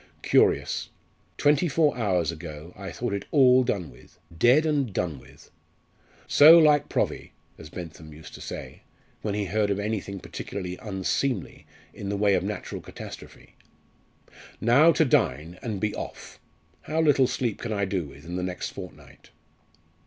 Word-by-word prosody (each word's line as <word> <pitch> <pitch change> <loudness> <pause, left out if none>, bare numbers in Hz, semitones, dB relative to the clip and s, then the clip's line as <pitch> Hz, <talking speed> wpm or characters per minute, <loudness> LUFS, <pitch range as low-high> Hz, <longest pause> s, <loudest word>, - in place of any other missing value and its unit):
Curious! - - +2 0.5
twenty 145 +3 +3
four 150 0 +2
hours 90 -8 0
ago 80 0 -9
I 100 -1 -7
thought 120 -4 -4
it 100 - -3
all 130 -3 +5
done 95 -8 -2
with - - -19 0.2
dead 125 - +4
and 145 -7 0
done 85 -7 -2
with. - - -18 0.8
'So 155 +3 +8
like 150 -3 +4
Provvy,' - - -2 0.3
as 80 - -10
Bentham 80 -2 -9
used 75 +1 -12
to - - -10
say, - - -8 0.4
when 105 -2 -2
he 105 -1 -1
heard 105 +3 0
of 100 - 0
anything 100 -2 -3
particularly 90 0 -6
unseemly 100 +2 -2 0.3
in 100 - -6
the 100 - -1
way 100 0 +3
of - - +2
natural - - -5
catastrophe. - - -11 1.1
Now 140 +9 +5
to 160 - +3
dine, 90 - 0
and 110 -5 -4
be 105 +1 -1
off! - - -8 0.4
How 155 +1 -3
little 145 -5 +4
sleep 125 -4 -2
can 120 - -4
I 100 -2 0
do 95 -3 -2
with 70 +1 -13
in 90 +2 -5
the - - -2
next 90 0 -4
fortnight?" - - -12
100 Hz, 160 wpm, -26 LUFS, 90-130 Hz, 1.1 s, So